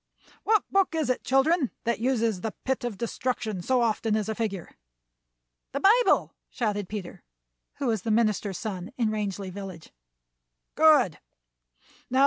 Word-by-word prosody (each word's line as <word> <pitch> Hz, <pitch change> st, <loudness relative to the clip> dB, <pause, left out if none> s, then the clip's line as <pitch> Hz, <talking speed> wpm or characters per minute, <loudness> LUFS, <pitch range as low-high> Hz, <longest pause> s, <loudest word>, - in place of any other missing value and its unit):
What 435 Hz, -1 st, +4 dB
book 390 Hz, -3 st, +2 dB
is 305 Hz, -6 st, +1 dB
it, 255 Hz, -, -3 dB
children, 270 Hz, +1 st, +3 dB
that 235 Hz, -1 st, 0 dB
uses 230 Hz, -5 st, 0 dB
the 220 Hz, -3 st, -3 dB
'pit 265 Hz, -1 st, -1 dB
of 240 Hz, -5 st, -3 dB
destruction' 235 Hz, -4 st, -2 dB
so 250 Hz, +5 st, +2 dB
often 220 Hz, -1 st, +1 dB
as 215 Hz, -2 st, -1 dB
a -, -, 0 dB
figure?" 205 Hz, -5 st, -4 dB, 1.0 s
"The 280 Hz, -, -1 dB
Bible!" 450 Hz, +9 st, +4 dB, 0.2 s
shouted 205 Hz, -5 st, -2 dB
Peter, 205 Hz, -4 st, -6 dB, 0.5 s
who 280 Hz, -, -4 dB
was 225 Hz, -5 st, +1 dB
the 225 Hz, -, -4 dB
minister's 215 Hz, -4 st, +1 dB
son 195 Hz, -1 st, -5 dB
in 225 Hz, -3 st, +1 dB
Rangeley 200 Hz, -3 st, -3 dB
Village. 185 Hz, -4 st, -8 dB, 0.8 s
"Good! 295 Hz, -, +5 dB
225 Hz, 140 wpm, -27 LUFS, 205-260 Hz, 1.0 s, Good